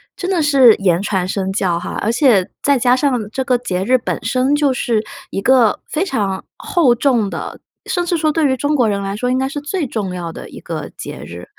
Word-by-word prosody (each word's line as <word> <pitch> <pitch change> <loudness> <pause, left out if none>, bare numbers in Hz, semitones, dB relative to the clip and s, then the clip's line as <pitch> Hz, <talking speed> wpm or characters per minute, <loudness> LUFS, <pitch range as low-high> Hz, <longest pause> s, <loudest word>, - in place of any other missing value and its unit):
真 365 +1 -3
的 355 -4 +1
是 275 -6 +6
言 185 -3 +1
传 190 -3 -1
身 190 0 -2
教 190 -3 0
哈， 175 - -5
而 215 - 0
且 230 -6 +3
再 280 -2 +3
加 245 +1 +4
上 255 -6 0
这 265 +4 -3
个 255 -2 +2
节 190 -7 -3
日 255 +6 +3
本 240 - -4
身 255 +5 +1
就 290 -2 +2
是 230 -3 0 0.3
一 195 - -3
个 245 -2 +4
非 320 +5 -1
常 205 - -2
厚 290 -10 +2
重 235 -5 +1
的， - - -6 0.3
甚 355 -2 -1
至 345 - 0
说 310 -1 +1
对 315 0 +1
于 260 - +1
中 290 +3 -1
国 245 -6 +3
人 200 -1 -1
来 195 0 -3
说 250 +3 -1
应 255 - +1
该 265 +1 -1
是 290 - -4
最 300 +3 -3
重 205 -7 -4
要 170 -2 -5
的 - - -9
一 - - -11
个 - - -5
节 - - -7
日。 85 +1 -9
245 Hz, 255 characters per minute, -18 LUFS, 200-280 Hz, 0.3 s, 是